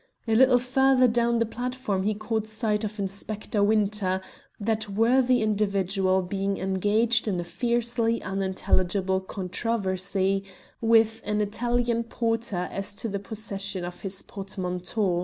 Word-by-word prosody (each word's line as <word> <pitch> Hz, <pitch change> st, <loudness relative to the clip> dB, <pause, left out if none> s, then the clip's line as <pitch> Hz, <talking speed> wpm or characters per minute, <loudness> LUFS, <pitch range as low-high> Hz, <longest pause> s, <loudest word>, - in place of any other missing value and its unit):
A 225 Hz, -, +1 dB
little 255 Hz, +2 st, +6 dB
further 255 Hz, +1 st, +4 dB
down 235 Hz, 0 st, +2 dB
the 230 Hz, -, +2 dB
platform 245 Hz, -3 st, -3 dB
he 210 Hz, +2 st, 0 dB
caught 220 Hz, 0 st, -2 dB
sight 215 Hz, -1 st, -1 dB
of 215 Hz, 0 st, -4 dB
Inspector 200 Hz, +2 st, -3 dB
Winter, 205 Hz, -2 st, +2 dB, 0.4 s
that 220 Hz, 0 st, -1 dB
worthy 245 Hz, +3 st, +3 dB
individual 195 Hz, -3 st, +1 dB
being 195 Hz, +2 st, -2 dB
engaged 210 Hz, +5 st, +2 dB
in 190 Hz, -4 st, 0 dB
a -, -, -2 dB
fiercely 230 Hz, +5 st, 0 dB
unintelligible 190 Hz, -1 st, 0 dB
controversy 195 Hz, 0 st, -1 dB, 0.4 s
with 225 Hz, -1 st, +4 dB
an 210 Hz, 0 st, -1 dB
Italian 235 Hz, +3 st, 0 dB
porter 230 Hz, -5 st, -2 dB
as 195 Hz, +1 st, -3 dB
to 225 Hz, -, -4 dB
the 200 Hz, 0 st, -2 dB
possession 200 Hz, -2 st, -4 dB
of 175 Hz, 0 st, -8 dB
his 195 Hz, -1 st, -5 dB
portmanteau. 185 Hz, -1 st, -2 dB
210 Hz, 130 wpm, -26 LUFS, 195-230 Hz, 0.4 s, little